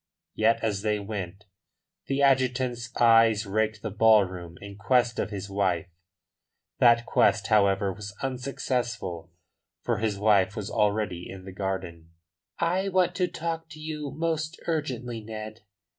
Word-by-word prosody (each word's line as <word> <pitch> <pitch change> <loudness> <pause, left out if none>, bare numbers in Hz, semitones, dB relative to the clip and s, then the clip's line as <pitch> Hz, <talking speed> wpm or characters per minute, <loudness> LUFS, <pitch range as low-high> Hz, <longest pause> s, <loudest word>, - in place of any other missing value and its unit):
Yet 110 +1 +2
as 105 -3 0
they 105 0 0
went 100 -1 -6 0.6
the 140 +1 0
adjutant's 125 -3 +1
eyes 115 -2 +5
raked 110 +1 -1
the 110 - -3
ballroom 95 -5 +3
in 100 0 -9
quest 120 +4 +1
of - - -1
his 100 -2 -5
wife. 95 -4 -1 0.9
That 120 -1 +5
quest, 105 -2 +3
however, 100 -2 +3
was 100 +1 -9
unsuccessful, 125 -9 -3 0.5
for - - 0
his 105 -2 -1
wife 105 -1 +3
was 105 -4 -5
already 105 -4 0
in 95 -1 -9
the 95 - -8
garden. 90 -4 -5 0.4
"I 185 +4 0
want 185 -1 +2
to 180 -2 +2
talk 165 -1 -4
to 155 - -11
you 155 -2 -5
most 160 +2 -2
urgently, 125 -8 -3
Ned. 110 0 -8
110 Hz, 140 wpm, -27 LUFS, 100-130 Hz, 0.9 s, eyes